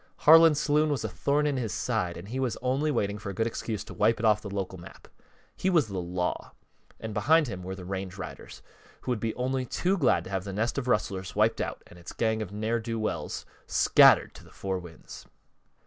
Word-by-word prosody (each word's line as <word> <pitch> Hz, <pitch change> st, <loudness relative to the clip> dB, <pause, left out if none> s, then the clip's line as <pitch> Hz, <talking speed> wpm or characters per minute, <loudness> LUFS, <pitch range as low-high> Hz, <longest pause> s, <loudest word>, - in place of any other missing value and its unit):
Harlan's 160 Hz, -1 st, +8 dB
saloon 150 Hz, +1 st, +2 dB
was 145 Hz, -5 st, -1 dB
a -, -, -1 dB
thorn 140 Hz, +10 st, 0 dB
in 145 Hz, -2 st, 0 dB
his 115 Hz, -5 st, -2 dB
side 85 Hz, -1 st, -2 dB
and 90 Hz, +4 st, -10 dB
he 130 Hz, +3 st, -3 dB
was 130 Hz, -3 st, -1 dB
only 135 Hz, +4 st, +1 dB
waiting 105 Hz, -7 st, -1 dB
for 100 Hz, -, -6 dB
a 100 Hz, -, -6 dB
good 115 Hz, -, 0 dB
excuse 110 Hz, -2 st, -4 dB
to -, -, -11 dB
wipe 110 Hz, +2 st, +2 dB
it 115 Hz, -, -1 dB
off 105 Hz, -1 st, +4 dB
the 105 Hz, -, -7 dB
local 95 Hz, -2 st, -4 dB
map. 85 Hz, -, -13 dB, 0.5 s
He 190 Hz, -, 0 dB
was 160 Hz, -, +3 dB
the 95 Hz, -2 st, -3 dB
Law, 90 Hz, 0 st, -3 dB, 0.5 s
and 110 Hz, -1 st, -6 dB
behind 160 Hz, +6 st, +3 dB
him 95 Hz, -5 st, -6 dB
were 95 Hz, +1 st, -6 dB
the 90 Hz, -2 st, -9 dB
range 95 Hz, 0 st, -5 dB
riders, 95 Hz, -, -9 dB, 0.4 s
who 125 Hz, -, -3 dB
would 120 Hz, -, -1 dB
be 110 Hz, +1 st, -2 dB
only 130 Hz, +1 st, -1 dB
too 180 Hz, +9 st, -1 dB
glad 125 Hz, -, +3 dB
to 95 Hz, -, -10 dB
have 95 Hz, -2 st, -2 dB
the 100 Hz, -1 st, -6 dB
nest 115 Hz, +7 st, -1 dB
of 130 Hz, -, -6 dB
rustlers 95 Hz, -6 st, -1 dB
wiped -, -, +2 dB
out -, -, -4 dB
and 85 Hz, -, -15 dB
its 85 Hz, -, -9 dB
gang 110 Hz, -1 st, 0 dB
of 100 Hz, -3 st, -5 dB
ne'er 110 Hz, +3 st, -1 dB
do 115 Hz, 0 st, -4 dB
wells 110 Hz, -1 st, -3 dB, 0.2 s
scattered -, -, +5 dB
to -, -, -14 dB
the -, -, -17 dB
four 95 Hz, -1 st, -4 dB
winds. 85 Hz, -3 st, -12 dB
110 Hz, 230 wpm, -28 LUFS, 95-130 Hz, 0.5 s, Harlan's